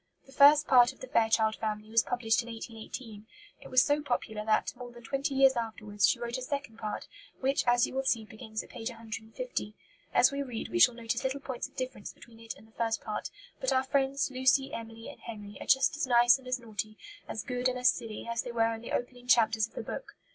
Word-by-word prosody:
The 270 - -17
first 285 +3 +7
part 245 -2 +6
of - - -20
the - - -7
Fairchild 225 -3 +2
Family 215 0 -4
was 230 0 +5
published 235 -2 +1
in 235 - -11
1818. 225 -1 -8 0.3
It - - -11
was 255 0 +6
so 290 0 +1
popular 220 -6 -2
that, 215 0 +1
more 245 0 -9
than 240 0 -14
twenty 275 +4 -2
years 270 0 +6
afterwards, 215 -3 0
she - - +2
wrote 240 +1 -3
a - - -8
second 275 -3 -4
part, 215 -2 -4 0.3
which, 270 +1 +1
as 240 0 +5
you - - -8
will 265 0 -1
see, 230 -4 +1
begins 220 0 -6
at - - -16
p. - - -9
150. 225 - -5 0.4
As - - +5
we 280 0 -2
read 245 -5 -5
we 350 - -1
shall 250 -7 +7
notice 230 -1 -3
little 265 +1 -1
points 265 -3 -5
of - - -28
difference 255 -5 -5
between 230 -1 -16
it 230 0 -7
and 220 - -17
the - - -24
first 225 0 -1
part; 215 -1 -4 0.3
but - - 0
our 260 - +3
friends, 270 +1 0
Lucy, 260 +1 +2
Emily, 225 0 -7
and - - -10
Henry 210 -3 -8
are - - -7
just 265 +1 +4
as 295 -2 -2
nice 240 +1 +6
and 260 - -15
as 255 0 -1
naughty, 215 -2 -6 0.3
as 215 - -4
good 250 +2 -1
and 255 0 -1
as 250 0 +5
silly, 225 0 -7
as 235 0 -1
they 245 - -6
were 230 -1 +2
in 225 - -7
the 235 - -8
opening 245 0 -4
chapters 225 -3 +4
of - - -28
the - - -4
book. - - -7
240 Hz, 235 wpm, -30 LUFS, 225-260 Hz, 0.4 s, first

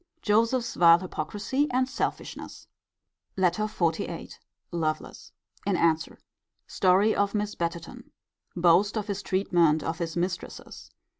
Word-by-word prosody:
Joseph's 230 +3 +2
vile 170 -1 +7
hypocrisy 205 - -2
and 255 +1 +1
selfishness. - - -5 0.7
LETTER 190 +3 +1
XLVIII. 170 -6 -2 0.4
Lovelace. 160 -2 -3 0.3
In 195 -2 0
answer. 160 -2 +1 0.5
Story 195 +4 +3
of 200 +1 0
Miss 210 0 -1
Betterton. 170 -2 -5 0.4
Boast 180 +5 +3
of 210 - -2
his 200 -2 -4
treatment 175 -5 +2
of 165 +2 -3
his 170 0 -3
mistresses. 180 +1 -5
185 Hz, 115 wpm, -27 LUFS, 170-210 Hz, 0.7 s, vile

